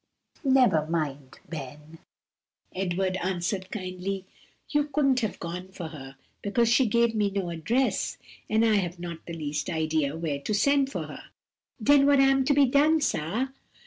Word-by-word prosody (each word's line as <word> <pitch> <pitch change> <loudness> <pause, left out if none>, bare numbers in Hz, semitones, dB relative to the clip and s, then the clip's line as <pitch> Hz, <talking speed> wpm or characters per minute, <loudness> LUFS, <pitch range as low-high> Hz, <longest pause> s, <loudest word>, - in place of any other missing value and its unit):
"Never 250 - +4
mind, 145 -5 -3
Ben," 150 +1 -9 0.7
Edward 185 0 -1
answered 185 +1 -2
kindly, 190 -1 -4 0.4
"you 295 -1 +1
couldn't 275 -3 +2
have 220 -5 -2
gone 180 +2 -6
for 180 -4 -7
her, 135 -4 -10 0.3
because 225 +3 +1
she 240 +2 +4
gave 235 +1 +2
me 210 -2 +1
no 195 -3 -3
address, 235 +11 0 0.3
and 220 +1 +3
I 220 -2 +4
have 175 -2 -2
not 170 -2 -7
the 170 - -5
least 150 -1 -3
idea 155 -2 0
where 155 -4 -2
to 210 +9 -2
send 275 +4 +3
for - - -3
her." - - -10 0.6
"Den 280 +2 +6
what 285 -1 +5
am 270 0 +4
to 285 - +3
be 285 -1 +6
done, 295 +5 +4
sah?" 230 - -1
190 Hz, 160 wpm, -27 LUFS, 165-255 Hz, 0.7 s, Den